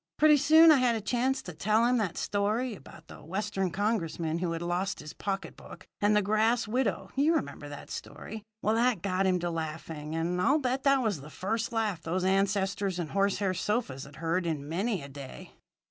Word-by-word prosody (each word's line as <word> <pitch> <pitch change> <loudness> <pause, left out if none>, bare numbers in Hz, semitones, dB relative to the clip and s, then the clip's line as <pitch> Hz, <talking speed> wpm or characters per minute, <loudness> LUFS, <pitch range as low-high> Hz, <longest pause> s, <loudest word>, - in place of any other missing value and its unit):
Pretty 300 -1 +6
soon 315 +3 +7
I 295 - +6
got 245 -2 +3
a - - -1
chance 255 +5 0
to 180 - -7
tell 215 +7 +2
him 250 +1 +3
that 185 -6 -2
story 215 +5 0
about 170 -4 -13
the - - -11
Western 195 +2 -2
Congressman 170 -5 -1
who 175 -1 -1
had 165 +1 -4
lost 180 +3 -1
his 150 0 -8
pocket 195 -3 -4
book - - -12 0.2
and 205 +1 +4
the 210 - +3
grass 215 +3 +2
widow 250 +4 -1
you 300 +5 +3
remember 145 - -3
that 145 - -9
story. 220 +1 -7 0.2
Well, 215 - +2
that 230 -5 +2
got 190 -1 +1
him 185 -1 +3
to 175 0 -1
laughing, 160 -1 -5
and 175 +2 -1
I'll 275 +11 +4
bet 260 -2 -1
that 275 -2 +4
was 205 -10 -1
the 150 - -10
first 220 +8 -2
laugh 215 -7 -1
those 180 +3 -2
ancestors 195 0 +1
and 170 -4 -4
horsehair 195 -1 +1
sofas 185 - -2
had 140 +1 -14
heard 165 +2 -1
in 145 -3 -3
many 190 +2 -1
a - - -7
day. 140 -1 -10
195 Hz, 205 wpm, -29 LUFS, 165-225 Hz, 0.2 s, soon